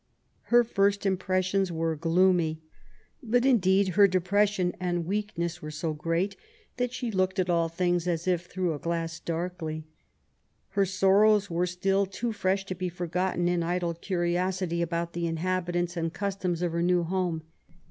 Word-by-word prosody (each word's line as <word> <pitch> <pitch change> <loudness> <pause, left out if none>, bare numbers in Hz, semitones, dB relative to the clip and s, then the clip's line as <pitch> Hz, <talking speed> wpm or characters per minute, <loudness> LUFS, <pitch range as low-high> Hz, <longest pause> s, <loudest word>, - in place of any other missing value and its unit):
Her 240 0 +5
first 200 -2 +1
impressions 185 0 +1
were 165 -1 -1
gloomy. 165 0 +2 0.6
But, 245 0 +1
indeed, 195 -6 +4
her 200 +2 +6
depression 185 0 +1
and 175 -2 -1
weakness 175 -3 -2
were 150 - -6
so 155 +1 -3
great, 165 +6 -1 0.4
that 250 -1 0
she 245 -2 -3
looked 190 -1 0
at 180 -1 +1
all 170 -1 +2
things, 175 0 0
as 170 0 -1
if 180 -1 0
'^through 180 -3 -1
a 145 - -6
glass, 165 0 -3
darkly 170 -1 -3
.^^ - - -15 0.9
Her 195 0 +1
sorrows 195 +2 +4
were 175 +2 +1
still 195 +2 +1
too 230 +5 -3
fresh 195 -1 0
to 190 - -4
be 185 0 -3
forgotten 175 +1 -1
in 175 -1 +1
idle 175 0 -1
cusiosity 175 0 -1
about 170 0 -2
the 170 0 -2
inhabitants 175 +1 -1
and 165 -1 -1
customs 185 -3 -2
of 175 - 0
her 170 +1 -1
new 175 0 +2
home. 175 -2 -1
180 Hz, 160 wpm, -28 LUFS, 170-195 Hz, 0.9 s, her